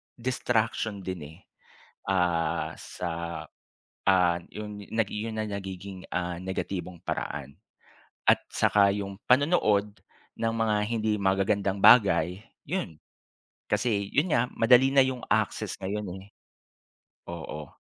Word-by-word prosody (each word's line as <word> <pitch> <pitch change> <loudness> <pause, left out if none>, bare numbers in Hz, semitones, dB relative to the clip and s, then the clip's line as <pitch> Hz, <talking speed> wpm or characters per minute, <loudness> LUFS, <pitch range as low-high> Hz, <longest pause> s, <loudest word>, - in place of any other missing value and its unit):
distraction 115 -4 -1
din 90 -2 -5
eh, - - -19 0.7
ah 90 -4 +1
sa, 90 - -5 1.0
ah, 90 -3 +4 0.2
'yon 105 -1 -7
'yon 110 0 -2
na 110 - -1
nagiging 95 -1 -6
ah, 90 -1 -2
negatibong 90 -1 -4
paraan 70 -1 -4 0.7
at - - +6
saka 100 -1 +4
'yong 100 -1 -5
panonood 110 - +3 0.4
ng 115 0 0
mga 110 -1 +1
hindi 110 -2 0
magagandang 100 0 +1
bagay, 95 -6 +6 0.3
'yon. 170 - -3 0.7
Kasi 105 -1 +1
'yon 155 +6 +2
nga 115 - +3
madali 125 +3 +5
na 140 - +7
'yong 130 -2 -4
access - - 0
ngayon 105 +2 -3 0.2
eh, 100 - -16 1.0
oo. 75 -3 -7
100 Hz, 110 wpm, -28 LUFS, 95-115 Hz, 1.0 s, na